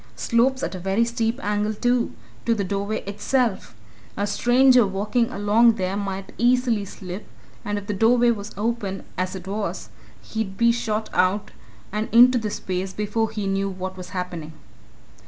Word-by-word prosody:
Slopes 260 +3 +1
at - - -2
a 185 - -5
very 195 +5 +1
steep 235 +1 -1
angle, 210 +1 0
too, 245 +2 +1 0.3
to 230 - +3
the 205 - -1
doorway 200 +3 -2
itself. 210 +2 -1 0.4
A 200 - 0
stranger 250 +4 +5
walking 210 +5 0
along 215 +3 +4
there 190 -2 -2
might 195 -1 -4
easily 240 -3 +2
slip, 185 +1 -8 0.4
and 205 0 -2
if 205 - -5
the 205 - -2
door 225 +5 +4
was 230 -4 +1
open, 210 -3 -2
as 185 +1 -2
it 190 0 -8
was, 205 +1 -3 0.3
he'd 210 -4 -4
be 235 0 +5
shot 220 -2 -2
out 195 +3 +1 0.4
and 210 +2 -2
into 240 -1 +6
space 190 -1 -3
before 210 +2 -1
he 210 -2 -4
knew 195 0 0
what 185 0 -5
was 180 -1 -9
happening." 175 -4 -5
210 Hz, 160 wpm, -23 LUFS, 195-230 Hz, 0.4 s, into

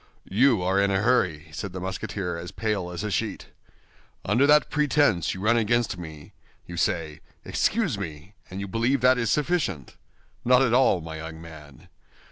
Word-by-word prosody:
"You 115 -1 +3
are 95 +2 +2
in 100 - +2
a 95 0 +1
hurry?" 90 -11 +1
said 95 +4 -6
the 95 - -5
Musketeer, 95 -1 -4
as 85 +1 -7
pale 105 -5 -2
as 90 +3 -5
a 105 - -3
sheet. - - -3 0.8
"Under 120 +8 +3
that 150 0 +4
pretense 145 - +2
you 95 - -7
run 115 +3 +3
against 115 -1 +1
me! 80 -4 -10 0.3
You 85 - -8
say, 80 -3 -1 0.3
'Excuse 195 - 0
me,' 80 0 -7 0.2
and 95 - -6
you 100 - -4
believe 115 +6 0
that 125 0 +4
is 115 - 0
sufficient? 150 - -1 0.5
Not 125 +2 +5
at 120 -3 +1
all, 125 -8 +4
my 80 0 -7
young 80 0 -8
man. 80 -4 -13
100 Hz, 175 wpm, -25 LUFS, 85-120 Hz, 0.8 s, Not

